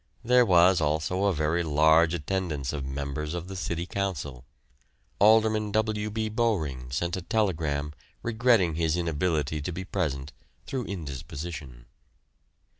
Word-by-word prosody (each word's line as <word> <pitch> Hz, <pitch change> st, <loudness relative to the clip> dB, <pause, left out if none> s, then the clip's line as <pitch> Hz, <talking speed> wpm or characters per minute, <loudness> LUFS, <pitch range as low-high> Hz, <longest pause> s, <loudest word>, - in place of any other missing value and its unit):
There 125 Hz, 0 st, +5 dB
was 90 Hz, 0 st, +5 dB
also 80 Hz, +6 st, 0 dB
a 100 Hz, -, +4 dB
very 80 Hz, +1 st, 0 dB
large 80 Hz, +1 st, +4 dB
attendance 80 Hz, -5 st, -2 dB
of 70 Hz, -3 st, -4 dB
members 70 Hz, +4 st, -4 dB
of 85 Hz, 0 st, -5 dB
the 95 Hz, -, -7 dB
City 85 Hz, -2 st, -3 dB
Council. 75 Hz, -10 st, -4 dB, 0.7 s
Alderman 110 Hz, 0 st, +4 dB
W. 110 Hz, -1 st, 0 dB
B. 110 Hz, +1 st, -2 dB
Bowring 85 Hz, -, -1 dB
sent 85 Hz, +8 st, -2 dB
a -, -, -4 dB
telegram 80 Hz, -8 st, -1 dB, 0.3 s
regretting 115 Hz, -6 st, +3 dB
his 80 Hz, +1 st, 0 dB
inability 80 Hz, -3 st, -1 dB
to 75 Hz, -, -4 dB
be 90 Hz, +2 st, -5 dB
present 75 Hz, -7 st, -3 dB, 0.3 s
through 130 Hz, -3 st, -3 dB
indisposition. 70 Hz, -5 st, -7 dB
85 Hz, 130 wpm, -27 LUFS, 75-100 Hz, 0.7 s, There